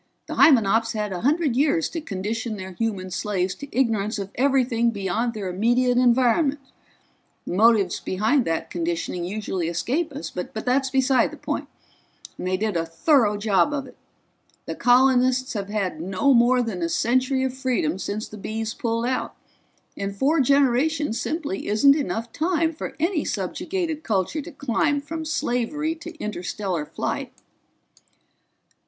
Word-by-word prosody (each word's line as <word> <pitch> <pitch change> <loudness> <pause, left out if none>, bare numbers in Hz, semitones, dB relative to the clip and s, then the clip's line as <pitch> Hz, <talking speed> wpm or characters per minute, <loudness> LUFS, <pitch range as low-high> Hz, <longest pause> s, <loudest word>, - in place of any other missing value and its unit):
The - - -6
Hymenops 230 -4 +4
had 210 -2 -2
a 175 - -4
hundred 295 -1 +1
years 300 +4 +2
to 330 - -5
condition 220 0 -4
their 190 -1 -7
human 190 -2 -3
slaves 185 -1 -1
to 285 - -9
ignorance 220 -5 0
of 200 -1 -5
everything 250 -3 +2
beyond 220 +3 -2
their 205 -3 -4
immediate 240 +6 +2
environment 255 +4 +3 0.9
the - - -4
motives 210 -2 +4
behind 220 +8 +1
that 165 0 -2
conditioning 170 +1 -2
usually 190 -3 -3
escape 250 - -1
us, 285 +1 -6
but 180 - -6
that's 260 +4 +1
beside 260 -2 +3
the - - -11
point - - -4 0.7
and - - -5
they 185 0 +1
did 215 -1 -1
a 165 - +1
thorough 210 - +2
job 205 +5 +2
of 280 -2 -2
it. - - -14 0.7
The - - -4
colonists 255 +1 +3
have 200 -3 -4
had 195 -6 -2
no 190 +10 +2
more 245 +1 +4
than 205 -6 -4
a 170 - 0
century 255 +6 +1
of 260 -1 -1
freedom 245 - -1
since 210 +2 -4
the 215 - -10
Bees 220 +2 -3
pulled 230 0 -2
out, 255 +1 -2 0.6
and 200 0 -4
four 285 +10 +2
generations 275 0 +2
simply 300 - -3
isn't 275 +7 +5
enough 230 -5 -3
time 330 0 +1
for 310 - -6
any 335 0 +1
subjugated 335 -5 -3
culture 220 - -1
to 340 - -9
climb 285 +1 0
from 315 +3 -6
slavery 295 +2 -1
to 335 0 -10
interstellar 185 - -3
flight." - - -3
235 Hz, 155 wpm, -24 LUFS, 200-280 Hz, 0.9 s, isn't